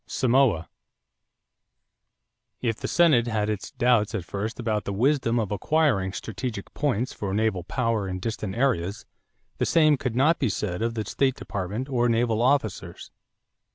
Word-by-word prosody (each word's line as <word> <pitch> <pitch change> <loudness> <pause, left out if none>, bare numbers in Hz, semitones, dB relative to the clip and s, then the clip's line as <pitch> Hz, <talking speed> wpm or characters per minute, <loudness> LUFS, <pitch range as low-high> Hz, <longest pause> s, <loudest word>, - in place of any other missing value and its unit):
=Samoa.= 125 -10 +2 1.9
If 115 -3 -1
the - - -4
Senate 155 -9 +4
had 110 -2 0
its 105 - -4
doubts 120 -4 +2
at 95 -5 -3
first 105 +6 -4
about 110 -3 -1
the 100 - -3
wisdom 120 +1 +2
of 105 -3 -2
acquiring 105 - +1
strategic 110 0 -5
points 130 -4 -1
for 100 -1 -3
naval 105 -4 0
power 115 -2 -1
in 95 -1 -3
distant 105 -2 -4
seas, 110 -7 0 0.5
the - - +2
same 155 -3 +4
could 125 -3 -3
not 150 +7 +3
be 135 -6 +1
said 90 -1 -3
of 115 0 -1
the 110 -2 -2
State 130 +5 +1
Department 100 +6 -4
or 120 -3 +1
naval 115 -1 +1
officers. 130 -4 -1
115 Hz, 155 wpm, -25 LUFS, 105-130 Hz, 1.9 s, Senate